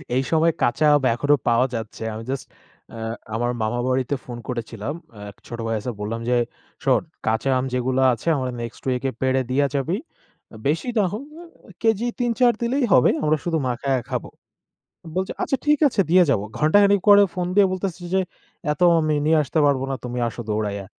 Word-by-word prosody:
এই 130 - +3
সময়ে 165 +1 +4
কাঁচা 140 +6 +2
আম 140 - +1
এখনো 145 +3 +3
পাওয়া 120 +2 +4
যাচ্ছে। 110 0 -6
আমি 110 +1 -6
just 135 - -4 0.5
অ্যা 115 - -9 0.4
আমার 120 +1 0
মামার 120 +3 -1
বাড়িতে 130 +2 0
ফোন 120 -1 -7
করেছিলাম। 115 +1 -4 0.4
এক 100 - -13
ছোট 120 -1 -7
ভাই 115 - 0
আছে। 125 +4 -4
বললাম 115 +2 -3
যে, 125 - +3 0.5
"শোন - - +3 0.3
কাঁচা 110 +4 +1
আম 130 - -1
যেগুলা 130 +1 +1
আছে, 115 - -8
আমার 130 -1 -2
next 115 -1 -7
week-এ 130 +1 -1
পেড়ে 130 0 +2
দিয়া 140 +2 +3
যাবি। 155 +7 0 0.7
বেশি 160 - 0
না 210 - +4
হোক, 225 +6 -4
এ - - -10 0.4
কেজি 225 +1 +2
৩-৪ 240 0 +3
দিলেই 245 +3 +1
হবে। 125 - +6
আমরা 155 0 +3
শুধু 165 -2 0
মাখায়া 130 +2 0
খাব।" - - -2 0.9
বলছে, 190 0 -1
"আচ্ছা 270 - 0
ঠিক 300 0 +4
আছে 230 - 0
দিয়ে 185 +1 +7
যাব।" 110 -8 +2 0.2
ঘণ্টাখানেক 200 +6 +4
পরে 205 0 +9
ফোন 180 -1 -2
দিয়ে 205 - +7
বলতেসে 185 -1 -4
যে, 190 - +4 0.5
"এত 150 - -8 0.2
আমি 155 -1 +1
নিয়ে 160 0 +4
আসতে 150 +3 -2
পারব 140 -2 +2
না। - - 0
তুমি 125 0 -4
আসো 120 - -8
দৌড়াইয়া।" 105 -2 -2
135 Hz, 185 wpm, -22 LUFS, 120-180 Hz, 0.9 s, পরে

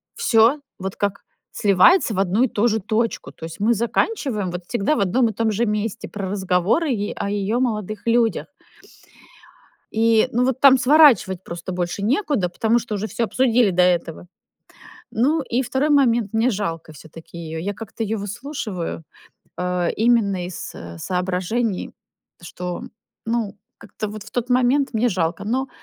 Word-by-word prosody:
всё 245 - +4 0.2
вот 190 0 -5
как 200 -1 -2 0.3
сливается 210 - +4
в 190 - -2
одну 195 +5 +2
и - - +3
ту 220 0 +1
же 220 -1 +1
точку. 220 +3 -2
То 160 - -10
есть 165 0 -9
мы 225 +3 +3
заканчиваем 230 - -1
вот 180 0 -6
всегда 240 +5 0
в - - -2
одном 215 +6 +2
и - - -5
том 225 0 0
же 220 +3 0
месте 210 -1 -2
про 195 -2 -5
разговоры 190 - +1
е 205 -4 -2
о - - -2
её 205 +3 -1
молодых 215 -4 -2
людях. 230 -1 +2 1.5
И 225 +1 +4
ну, 245 +2 +2
вот 260 0 -1
там 270 -1 +7
сворачивать 250 - +5
просто 175 +2 -7
больше 180 +2 -3
некуда, 250 - +1
потому 225 +6 +1
что 225 -2 -5
уже 205 +1 -3
всё 235 - -2
обсудили 240 -2 +2
до 180 0 +2
этого. 175 -1 0 0.9
Ну 290 +8 +2
и 245 - +3
2 265 +4 0
момент, 240 -7 +3
мне 225 +3 +3
жалко 165 -7 -4
все-таки 160 +3 -12
её. 160 -1 -6
Я 200 +4 -3
как-то 225 +2 -7
ее 220 +1 -2
выслушиваю, 205 - -5 0.5
а, 180 -1 -1
именно 215 -5 +2
из 180 - -7 0.2
соображений, 185 - -2 0.5
что, 175 +1 -6 0.4
ну, 225 -3 -1 0.2
как-то 215 - -6
вот 210 0 -8
в - - -13
тот 245 0 -3
момент 255 +3 +3
мне 230 +3 +2
жалко. 170 -5 -2
Но. 260 +5 -1
215 Hz, 165 wpm, -21 LUFS, 185-240 Hz, 1.5 s, там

